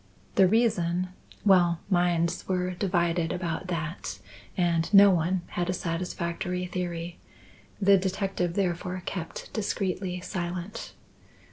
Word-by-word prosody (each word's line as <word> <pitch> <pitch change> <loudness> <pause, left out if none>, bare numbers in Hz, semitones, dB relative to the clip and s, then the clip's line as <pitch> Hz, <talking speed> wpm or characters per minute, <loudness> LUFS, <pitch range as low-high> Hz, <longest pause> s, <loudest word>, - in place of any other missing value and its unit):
The 190 -2 +6
reason 185 -5 +2 0.4
well, 175 -4 +5
minds 175 -3 +1
were 180 -1 0
divided 175 -3 0
about 180 0 -3
that, 170 -1 -4 0.4
and 170 -1 +1
no 200 -1 +9
one 175 +1 +1
had 175 0 -2
a - - +2
satisfactory 175 +1 -2
theory. 175 -1 -4 0.6
The 200 -1 +6
detective 190 -2 -1
therefore 180 -1 -1
kept 165 -4 -5
discreetly 190 -3 -2
silent. 180 +3 -5
180 Hz, 110 wpm, -28 LUFS, 170-190 Hz, 0.6 s, no